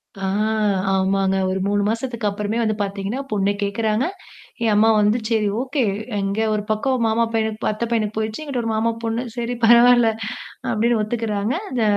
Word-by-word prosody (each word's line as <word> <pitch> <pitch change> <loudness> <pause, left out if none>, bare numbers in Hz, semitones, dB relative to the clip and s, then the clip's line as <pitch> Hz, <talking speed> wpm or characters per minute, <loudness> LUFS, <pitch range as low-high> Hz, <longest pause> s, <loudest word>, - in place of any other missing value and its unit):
ஆ 195 0 -4 0.6
ஆமாங்க. 195 0 +1
ஒரு 190 0 -1
3 205 0 +1
மாசத்துக்கு 230 -1 -2
அப்புறமே 210 +2 -3
வந்து 215 -1 0
பார்த்தீங்கன்னா 200 +6 -3
பொண்ணு 200 -1 +1
கேட்குறாங்க. 215 +4 0 0.6
என் 220 -2 +3
அம்மா 220 +2 +5
வந்து 210 +3 +3
சரி 220 -2 +1
ஓகே. 270 +1 -1 0.4
எங்க 195 +2 -1
ஒரு 210 -1 -1
பக்கம் 245 +2 0
மாமா 225 +1 +2
பையனுக்கு 220 0 -1
அத்த 215 +2 -4
பையனுக்கு 220 -2 -1
போயிடுச்சு. 220 +6 -2
எனங்கிட்ட 275 -5 -3
ஒரு 225 - -1
மாமா 230 +1 +1
பொண்ணு. 230 +2 -1
சரி, 240 +1 -2
பரவால்ல. 240 0 +6 0.6
அப்படின்னு 230 +1 +2
ஒத்துக்கறாங்க. 215 0 -1 0.2
இந்த 245 -3 0
220 Hz, 160 wpm, -21 LUFS, 205-235 Hz, 0.6 s, பரவால்ல